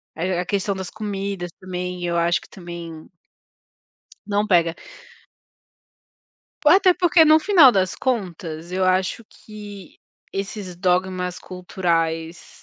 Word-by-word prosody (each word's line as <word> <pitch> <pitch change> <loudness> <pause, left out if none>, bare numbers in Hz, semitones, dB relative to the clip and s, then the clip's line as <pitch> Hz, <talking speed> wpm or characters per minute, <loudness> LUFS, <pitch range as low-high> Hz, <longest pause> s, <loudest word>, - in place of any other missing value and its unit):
A 175 +2 -1
a - - -5
questão 200 +1 -1
das 190 -1 -6
comidas 200 -4 -4
também, 180 -1 -5
eu 170 0 -1
acho 170 +1 +2
que, - - -17
também 170 -3 -9 1.2
não 205 0 0
pega. 170 -4 +3 1.9
Ou 300 - +8
até 375 0 +6
porque 355 -2 +4
no 310 0 +6
final 325 -6 +6
das 190 -4 0
contas 175 -8 -3
eu 185 0 0
acho 185 +4 0
que 205 -3 -12 0.4
esses 195 -1 -5
dogmas 180 0 0
culturais, 170 -2 -3
185 Hz, 120 wpm, -22 LUFS, 175-205 Hz, 1.9 s, Ou